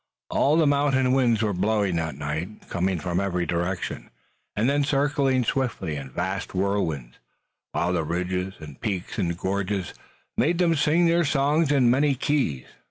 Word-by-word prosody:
All 150 Hz, +3 st, +3 dB
the 165 Hz, -, +4 dB
mountain 140 Hz, -3 st, +2 dB
winds 120 Hz, -4 st, +3 dB
were 105 Hz, -2 st, 0 dB
blowing 100 Hz, 0 st, +1 dB
that 80 Hz, -4 st, -2 dB
night, 80 Hz, +8 st, -5 dB
coming 90 Hz, +1 st, 0 dB
from 85 Hz, +3 st, -1 dB
every 90 Hz, -3 st, -1 dB
direction, 85 Hz, +3 st, -3 dB, 0.5 s
and 105 Hz, +3 st, +1 dB
then 145 Hz, +1 st, +2 dB
circling 140 Hz, -2 st, +1 dB
swiftly 115 Hz, -, -1 dB
in 70 Hz, -2 st, -6 dB
vast 95 Hz, +8 st, -3 dB
whirlwinds, 85 Hz, -10 st, -1 dB, 0.5 s
while 90 Hz, +2 st, 0 dB
the 85 Hz, -2 st, 0 dB
ridges 90 Hz, +3 st, -2 dB
and 75 Hz, -4 st, -11 dB
peaks 100 Hz, -4 st, -3 dB
and 85 Hz, -3 st, -1 dB
gorges 95 Hz, 0 st, -2 dB, 0.4 s
made 170 Hz, +3 st, +2 dB
them 175 Hz, -2 st, +3 dB
sing 160 Hz, +3 st, +3 dB
their 170 Hz, +1 st, +3 dB
songs 145 Hz, +1 st, +2 dB
in 130 Hz, -4 st, +4 dB
many 140 Hz, +2 st, +3 dB
keys. 125 Hz, -, 0 dB
100 Hz, 160 wpm, -25 LUFS, 90-140 Hz, 0.5 s, the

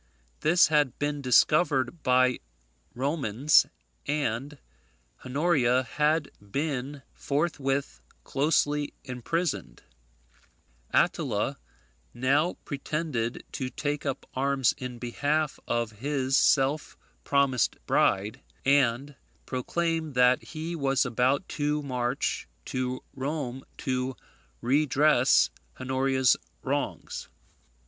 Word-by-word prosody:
This 170 Hz, +1 st, +4 dB
had 150 Hz, -5 st, +2 dB
been 145 Hz, 0 st, -2 dB
discovered 140 Hz, +2 st, +3 dB
by 125 Hz, 0 st, +3 dB, 0.6 s
Romans, 135 Hz, 0 st, +3 dB, 0.4 s
and 145 Hz, -1 st, -2 dB, 0.7 s
Honoria 130 Hz, -3 st, +2 dB
had 150 Hz, +4 st, 0 dB
been 140 Hz, +4 st, -3 dB
forthwith 140 Hz, -, -1 dB, 0.2 s
closely 145 Hz, -, +1 dB
imprisoned, 125 Hz, -, -3 dB, 1.1 s
Attila -, -, +1 dB, 0.6 s
now 140 Hz, +7 st, +2 dB
pretended 140 Hz, -5 st, -3 dB
to 130 Hz, -2 st, -3 dB
take 145 Hz, +2 st, -3 dB
up 135 Hz, -1 st, -4 dB
arms 135 Hz, -1 st, +2 dB
in 125 Hz, -1 st, -6 dB
behalf 145 Hz, +5 st, -1 dB
of 120 Hz, -1 st, 0 dB
his 135 Hz, +4 st, -1 dB
self 140 Hz, +3 st, +2 dB, 0.3 s
promised 140 Hz, -4 st, +2 dB
bride, 100 Hz, +2 st, +1 dB, 0.2 s
and 135 Hz, 0 st, +2 dB, 0.3 s
proclaimed 160 Hz, +3 st, -2 dB
that 125 Hz, 0 st, +5 dB
he 165 Hz, +1 st, -6 dB
was 135 Hz, -4 st, +1 dB
about 125 Hz, +7 st, +1 dB
to 150 Hz, 0 st, -1 dB
march 125 Hz, -1 st, -2 dB, 0.2 s
to 130 Hz, 0 st, -3 dB
Rome 135 Hz, -2 st, -4 dB
to 130 Hz, 0 st, -2 dB, 0.5 s
redress 140 Hz, 0 st, +4 dB, 0.3 s
Honoria's 130 Hz, -1 st, +2 dB, 0.3 s
wrongs. -, -, -3 dB
135 Hz, 90 wpm, -27 LUFS, 125-150 Hz, 1.1 s, that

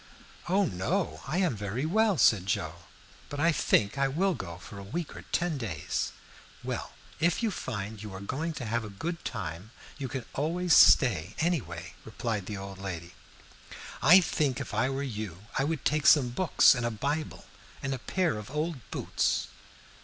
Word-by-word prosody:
"Oh 195 Hz, +2 st, +3 dB
no, 160 Hz, -, -1 dB
I 165 Hz, -, -1 dB
am 180 Hz, -9 st, +2 dB
very 105 Hz, +7 st, -3 dB
well," 210 Hz, +3 st, +3 dB
said 100 Hz, -8 st, +4 dB
Joe; 100 Hz, -, -1 dB, 0.5 s
"but 145 Hz, -, -5 dB
I 165 Hz, +3 st, +4 dB
think 105 Hz, -6 st, +2 dB
I 135 Hz, -, +3 dB
will 180 Hz, +8 st, +1 dB
go 85 Hz, -, -6 dB
for 100 Hz, +3 st, -10 dB
a -, -, -8 dB
week 160 Hz, -, -5 dB
or -, -, -8 dB
ten 170 Hz, -4 st, 0 dB
days." 90 Hz, -, -2 dB, 0.5 s
"Well, -, -, -4 dB, 0.3 s
if 170 Hz, +7 st, +2 dB
you 225 Hz, -, +2 dB
find 110 Hz, -, -5 dB
you 105 Hz, -2 st, -7 dB
are -, -, -6 dB
going 145 Hz, +11 st, -3 dB
to 125 Hz, -, -5 dB
have 115 Hz, +1 st, -1 dB
a 105 Hz, -, -6 dB
good 165 Hz, -, -5 dB
time, 85 Hz, +6 st, -5 dB, 0.3 s
you 135 Hz, -, -2 dB
can 125 Hz, -1 st, -5 dB
always 170 Hz, +3 st, +2 dB
stay, 105 Hz, -, +6 dB
any 170 Hz, -2 st, +1 dB
way," 85 Hz, -1 st, -8 dB
replied 110 Hz, -3 st, -3 dB
the 105 Hz, -, -4 dB
old 95 Hz, 0 st, -8 dB
lady. 90 Hz, -3 st, -6 dB, 0.9 s
"I 185 Hz, +4 st, +8 dB
think 145 Hz, -6 st, 0 dB
if -, -, -6 dB
I 130 Hz, -, +2 dB
were 135 Hz, +1 st, -2 dB
you 105 Hz, -8 st, -5 dB, 0.2 s
I -, -, +3 dB
would 160 Hz, -1 st, -2 dB
take 150 Hz, -2 st, +2 dB
some 130 Hz, -3 st, +6 dB
books 160 Hz, +7 st, +5 dB
and 125 Hz, -2 st, -2 dB
a 120 Hz, -, +1 dB
Bible 140 Hz, +8 st, -3 dB, 0.4 s
and 135 Hz, 0 st, -1 dB
a 130 Hz, -, -4 dB
pair 170 Hz, -, 0 dB
of 105 Hz, -, -9 dB
old 155 Hz, +2 st, -2 dB
boots." -, -, 0 dB
130 Hz, 185 wpm, -29 LUFS, 100-160 Hz, 0.9 s, I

